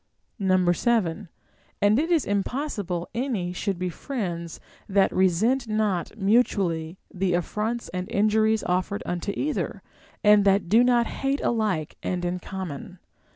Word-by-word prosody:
7. 205 -4 0 0.5
And 205 +4 +4
it 325 +3 0
is 335 -4 +2
impossible 200 - -2
any 230 -8 -2
should 195 0 -2
be 180 0 -2
friends 170 - -5 0.3
that 195 0 +3
resent 215 +8 +2
not 215 -3 -1
mutually 195 -6 +1 0.2
the 185 -1 0
affronts 215 +6 -2
and 180 0 -4
injuries 215 +1 +2
offered 180 +3 -1
unto 175 +3 -2
either, 300 +1 -2 0.4
and 210 -1 +6
that 195 -1 +3
do 230 +4 +6
not 240 -1 +3
hate 275 +3 -2
alike 210 -10 -1
and 180 -1 -2
in 180 +1 -2
common. 185 -2 -7
200 Hz, 130 wpm, -25 LUFS, 180-225 Hz, 0.5 s, and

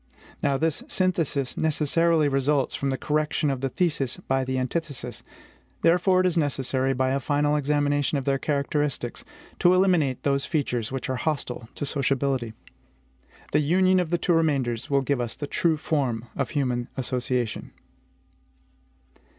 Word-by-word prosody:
Now, 140 -1 +2
this 160 +1 -1
synthesis 165 -8 0
necessarily 160 +1 +2
results 135 0 +1
from 140 - -2
the 135 - -1
correction 150 0 0
of 130 -2 -3
the 135 - 0
thesis 145 -5 -1
by 135 0 -1
the 130 0 -2
antithesis. 130 -2 -3 0.6
Therefore 180 +2 +4
it - - 0
is 180 - +2
necessary, 135 -4 0
by 130 0 +1
a 135 - +1
final 145 +2 +1
examination 145 0 +1
of 135 - -3
their 135 -1 +1
characteristics, 140 -3 -1 0.4
to 175 +1 +5
eliminate 175 -9 +2
those 140 -1 +1
features 125 -8 -1
which 130 -2 -3
are 130 -1 -2
hostile 125 -6 -3
to - - -3
sociability. 135 -4 0 1.0
The 150 - +3
union 185 +5 +3
of 175 -3 -1
the 175 - +1
two 175 +1 +1
remainders 140 -6 0
will 140 -1 +3
give 135 -1 0
us 120 -2 -3
the 145 - -5
true 160 +2 +1
form 130 -7 -1
of 135 - -1
human 125 -4 -1
association. 125 -2 -2
140 Hz, 150 wpm, -25 LUFS, 130-155 Hz, 1.0 s, to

